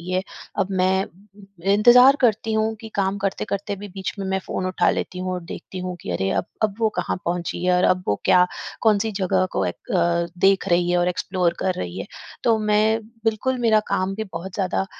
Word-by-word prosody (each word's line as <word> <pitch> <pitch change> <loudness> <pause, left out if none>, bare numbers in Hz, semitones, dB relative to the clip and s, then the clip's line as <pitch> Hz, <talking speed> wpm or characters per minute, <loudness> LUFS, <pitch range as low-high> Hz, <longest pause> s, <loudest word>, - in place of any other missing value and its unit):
है, 185 +2 -2 0.4
अब 190 - +1
मैं 190 0 +1 0.7
इंतज़ार 250 +6 +7
करती 225 -2 +2
हूँ 220 0 +1
कि 225 - -8
काम 195 0 0
करते-करते 200 +1 -2
भी 205 +2 -8
बीच 190 -1 -4
में 195 - -3
मैं 190 0 0
फ़ोन 185 - -4
उठा 185 -1 +2
लेती 180 - -3
हूँ 185 0 -3
और 180 - -3
देखती 185 +2 -8
हूँ 180 -1 -4
कि - - -6
अरे! 95 +3 -1
अब 95 - 0 0.2
अब 210 -2 +1
वो 220 - +4
कहाँ 180 - -1
पहुँची 175 0 -2
है 180 - +3
और 180 - +2
अब 185 0 +3
वो 105 - +3
क्या 180 0 +5 0.4
कौन-सी 220 0 +3
जगह 190 -1 +1
को 95 - 0
एक 90 - -7
अ, 170 -1 +2
देख 195 +1 +3
रही 175 0 +2
है 180 - +2
और 175 0 +2
एक्सप्लोर 180 -1 0
कर 185 -1 0
रही 90 0 -5
है? 95 - -5 0.4
तो 230 -2 +4
मैं 215 +1 +2 0.2
बिल्कुल 225 +4 0
मेरा 220 -2 +4
काम 185 +1 0
भी 220 +2 -3
बहुत 175 +3 -6
ज़्यादा 190 -1 -1
190 Hz, 210 wpm, -22 LUFS, 180-215 Hz, 0.7 s, इंतज़ार